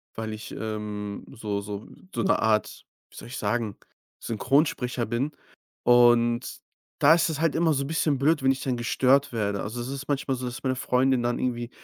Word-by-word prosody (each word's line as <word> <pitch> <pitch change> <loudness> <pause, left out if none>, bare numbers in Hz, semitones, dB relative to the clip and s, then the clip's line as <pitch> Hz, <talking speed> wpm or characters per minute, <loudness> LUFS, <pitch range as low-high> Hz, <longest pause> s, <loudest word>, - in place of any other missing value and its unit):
weil 110 -1 -4
ich, 110 - -8
ähm, 105 -2 -5
so 105 -3 -3
so 100 0 -7 0.3
so - - -1
'ne 195 - +3
Art, 110 -1 0 0.3
wie - - -18
soll - - -9
ich 135 - -6
sagen, 110 0 -1 0.5
Synchronsprecher 125 0 +1
bin. 120 +6 -1 0.5
Und 120 0 +4 0.4
da 150 +3 +7
ist 170 0 +2
es 160 0 -3
halt 165 -2 +2
immer 160 -1 +3
so 140 -1 0
'n - - -5
bisschen 150 -3 +1
blöd 150 0 +2
wenn 135 - +5
ich 135 -1 -3
dann 125 -2 -1
gestört 130 +3 +2
werde. 100 -3 -1
Also, 110 +4 -4
es 120 - -5
ist 140 +1 -6
manchmal 135 -2 -1
so, 125 - -5
dass 125 +2 -6
meine 130 -1 0
Freundin 130 0 +2
dann 120 0 0
irgendwie 120 -1 -2
120 Hz, 200 wpm, -26 LUFS, 110-135 Hz, 0.5 s, da